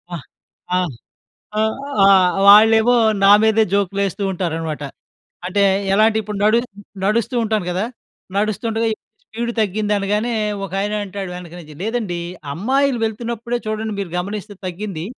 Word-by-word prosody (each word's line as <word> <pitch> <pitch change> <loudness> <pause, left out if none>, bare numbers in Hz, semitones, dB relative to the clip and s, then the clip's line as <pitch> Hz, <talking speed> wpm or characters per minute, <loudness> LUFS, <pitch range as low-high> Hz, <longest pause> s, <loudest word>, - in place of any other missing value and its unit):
ఆహ్, 160 - -8 0.6
ఆహ్, 180 -4 -1 0.7
ఆహ్, 220 0 +1 0.3
ఆహ్, 190 -2 +5
వాళ్ళేమో 220 +3 +7 0.3
నా 195 - +7
మీదే 220 0 +4
జోకులు 200 -1 0
వేస్తూ 200 +1 -3
ఉంటారన్నమాట. 165 -4 -3 0.6
అంటే 200 +2 +1 0.3
ఎలా 210 +2 +4
అంటే 220 - -2
ఇప్పుడు 210 0 -5
నడు 215 +2 +4 0.5
నడుస్తూ 230 +5 0
ఉంటాను 215 -4 -1
కదా! 185 +4 -1 0.5
నడుస్తుండగా 220 +2 -1 0.4
స్పీడ్ 235 +1 -4
తగ్గింది 210 +1 0
అనగానే, 210 +4 -1 0.3
ఒకాయన 195 +2 -2
అంటాడు 195 -1 -6
వెనక 175 -2 -9
నుంచి, 155 -3 -12
"లేదండి 215 -6 -2 0.3
అమ్మాయిలు 260 - +1
వెళ్తున్నప్పుడే 235 +2 -3
చూడండి 215 0 -3
మీరు 195 -4 -4
గమనిస్తే 205 +2 -6
తగ్గింది, 180 -2 -5
210 Hz, 130 wpm, -19 LUFS, 185-220 Hz, 0.7 s, వాళ్ళేమో